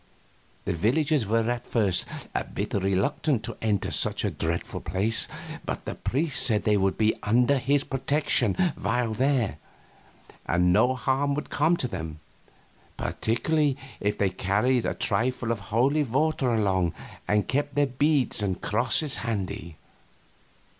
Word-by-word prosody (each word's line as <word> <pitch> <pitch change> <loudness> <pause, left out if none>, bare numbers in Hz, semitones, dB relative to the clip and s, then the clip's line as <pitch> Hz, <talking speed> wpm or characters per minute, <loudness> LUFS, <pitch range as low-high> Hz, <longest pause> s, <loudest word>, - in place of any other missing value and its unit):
The - - 0
villagers 130 - +1
were 115 +1 +1
at 120 0 -4
first 100 -6 +2 0.3
a - - -1
bit - - -5
reluctant 100 - 0
to - - -5
enter 105 -3 0
such - - +1
a - - 0
dreadful 85 +1 -3
place, 105 +4 +1 0.4
but - - -5
the - - -3
priest 145 0 0
said 110 -4 +4
they 105 - +3
would 95 -1 +1
be 110 0 +3
under 125 +6 +3
his 140 +2 +1
protection 135 -5 +1 0.2
while 115 +2 -1
there, 120 - 0 0.9
and 90 +1 +3
no 125 +6 +3
harm 135 +2 0
could 150 - -5
come 160 +4 +2
to 130 - -2
them, 80 -7 -6 0.8
particularly 140 +5 0 0.2
if 105 +1 -1
they 100 -2 +1
carried 105 +7 +1
a - - -2
trifle 115 +3 0
of 115 - -2
holy 130 +8 +2
water 135 0 0
along 95 -6 +1 0.3
and 105 0 +1
kept 145 +1 -1
their 145 0 +3
beads 140 -2 +1
and 95 -3 -1
crosses 125 +6 +2
handy. 100 -7 -4
115 Hz, 145 wpm, -26 LUFS, 100-135 Hz, 0.9 s, said